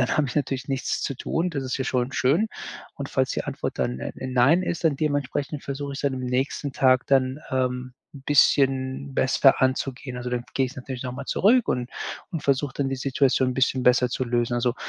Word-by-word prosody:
dann 125 - +2
habe 150 - +2
ich 125 - -6
natürlich 135 -1 -1
nichts 135 -1 -1
zu 140 - -2
tun. 170 +6 -1
Das 140 -4 -3
ist 130 - -2
ja 130 - -1
schon 125 0 -1
schön. 165 +13 +2 0.5
Und - - -6
falls - - 0
die - - -2
Antwort - - -4
dann, 60 +1 -1
äh, - - -4
nein 130 +8 +4
ist, 175 -1 -3
dann 155 -4 +3
dementsprechend 145 0 -2
versuche 140 0 -4
ich's 140 - -5
dann 140 -2 +1
am 130 - -5
nächsten 130 +2 -2
Tag 130 -1 +3
dann, 130 0 +2
ähm, 125 -1 -1 0.2
'n 135 - -11
bisschen 135 -1 +2
besser 135 +1 +4
anzugehen. 130 -1 -1
Also 125 0 -4
dann 120 -1 -2
gehe 135 -1 +2
ich 135 - -10
natürlich 130 -1 -6
nochmal 125 0 -6
zurück 235 +5 +3
und 125 -1 -1 0.4
und 165 -4 -4
versuche 140 0 +1
dann 140 -1 0
die 135 - -2
Situation 130 0 +2
'n 125 - -4
bisschen 130 0 +1
besser 125 0 +4
zu 130 +1 -2
lösen. 120 0 0
Also, 120 0 +1
130 Hz, 215 wpm, -25 LUFS, 125-140 Hz, 0.5 s, nein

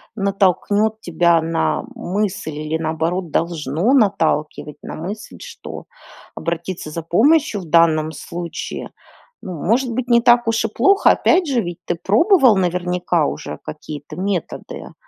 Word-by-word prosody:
натолкнет 205 +2 +1
тебя 170 -2 +2
на 165 +9 0
мысль 205 -6 -3
или, 155 +1 -3
наоборот, 165 +2 -2
должно 165 - 0
наталкивать 160 - +1
на - - -7
мысль, 195 +7 -7
что 485 -2 -9 0.5
обратиться 170 0 -4
за 165 +2 -5
помощью 225 - +3
в - - -10
данном 160 -2 +3
случае, 170 +2 -6 0.5
ну, 185 - -6
может 240 +5 +1
быть, 250 +1 -3
не 235 -1 +4
так 240 -1 +4
уж 225 0 +1
и - - -1
плохо. 390 - +4
Опять 350 -1 +2
же, 250 -4 +1
ведь 175 -2 -6
ты 175 - -1
пробовал, 255 - +4
наверняка, 180 -3 0
уже - - -6
какие-то 150 0 -8
методы, 185 0 -4
180 Hz, 135 wpm, -19 LUFS, 165-225 Hz, 0.5 s, не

